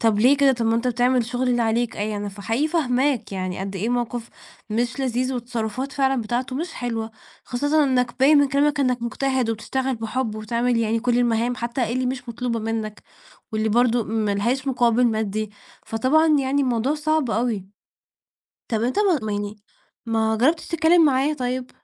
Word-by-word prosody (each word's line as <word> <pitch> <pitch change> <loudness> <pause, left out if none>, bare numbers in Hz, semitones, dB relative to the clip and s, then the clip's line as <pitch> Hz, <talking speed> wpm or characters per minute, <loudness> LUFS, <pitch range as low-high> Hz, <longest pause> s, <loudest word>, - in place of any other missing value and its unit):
طَب 220 -2 +2
ليه 260 +6 +5
كده؟ 275 -1 +4
طَب 235 -2 -1
ما 225 - +2
أنتَ 235 +2 0
بتعمل 245 +2 +2
الشغل 245 +2 -1
اللي 240 -1 +2
عليك، 230 +1 0
إيه 210 +1 -2
يعني؟ 205 -1 -4
فحقيقي 225 +9 -1
فاهِماك 260 - 0
يعني، 185 -1 -3
قد 195 0 -4
إيه 210 +5 -2
موقف 240 -1 -2 0.4
مش 240 +4 -1
لذيذ، 255 0 0
والتصرفات 240 +2 -4
فعلًا 270 -2 +1
بتاعته 245 +4 -2
مش 325 +2 -4
حلوة، 230 -2 -3 0.3
خاصةً 290 +4 +1
إنَّك 250 -2 0
بايِن 285 +3 +6
من 285 - +4
كلامَك 285 +2 +2
إنَّك 250 -3 +1
مجتهِد 255 0 0
وبتشتغَل 260 +4 -2
بحب 225 0 -3
وبتعمل 235 +3 0
يعني 225 0 0
كل 245 0 +1
المهام، 240 0 +1
حتى 235 -1 -2
اللي 255 +1 0
مش 250 -1 -4
مطلوبة 235 0 -2
منَّك، 220 -1 -4 0.5
واللي 215 0 0
برضه 240 +1 +2
ما 215 -1 -1
لهاش 245 +7 -1
مقابِل 245 -1 +3
مادي. 215 -1 -1 0.4
فطبعًا 265 +8 +2
يعني 275 +1 +1
الموضوع 255 +2 +1
صعب 305 -3 0
أوي. 220 -4 -1 1.0
طب 225 -1 -1
أنت 250 +9 0
ما 390 -6 +3
ما 215 -1 -2
يعني 205 +1 -3 0.5
ما 220 -1 +1
جرَّبتِش 305 +9 +1
تتكلَّم 335 0 +4
معاه 280 +1 +2
طيب؟ 250 -1 -3
245 Hz, 175 wpm, -23 LUFS, 225-265 Hz, 1.0 s, بايِن